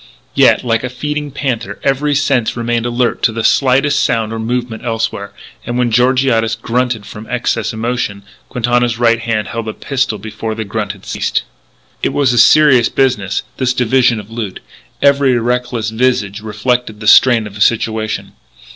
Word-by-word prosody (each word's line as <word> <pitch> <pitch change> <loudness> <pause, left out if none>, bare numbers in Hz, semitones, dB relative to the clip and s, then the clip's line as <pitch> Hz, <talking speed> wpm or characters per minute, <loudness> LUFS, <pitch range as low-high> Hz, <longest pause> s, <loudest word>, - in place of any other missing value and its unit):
Yet, - - +4
like 115 -1 0
a 125 - -3
feeding 150 +4 -4
panther, 125 -7 -3
every 145 +2 +1
sense 135 -5 +1
remained 120 0 -1
alert 120 0 0
to - - +3
the 115 0 -4
slightest 140 +3 +3
sound 115 -1 0
or 115 - -4
movement 120 0 -3
elsewhere; 115 -3 -3 0.3
and 120 - -3
when 125 -1 +1
Georgiades 125 -2 +2
grunted 115 -1 -2
from 105 +2 -10
excess 125 -1 -1
emotion, 110 -3 -3 0.3
Quintana's 120 -1 0
right 115 -1 +3
hand 115 -3 -2
held 115 -1 -4
a 110 - -3
pistol 130 -5 -2
before 110 +2 -5
the 110 0 -4
grunt 105 0 -3
had 100 -2 -17
ceased. - - -1 0.6
It - - -1
was 135 -4 +2
a 120 - +2
serious 130 -1 +6
business, 120 -8 0
this 125 -1 0
division 125 -1 +2
of 105 +1 -11
loot; 110 -5 -5 0.4
every 140 -3 +4
reckless 120 -2 -1
visage 110 -4 0
reflected 110 +1 -2
the 105 - -8
strain 115 0 +6
of 105 - -9
the 105 - -9
situation. 110 0 0
120 Hz, 165 wpm, -15 LUFS, 110-125 Hz, 0.6 s, serious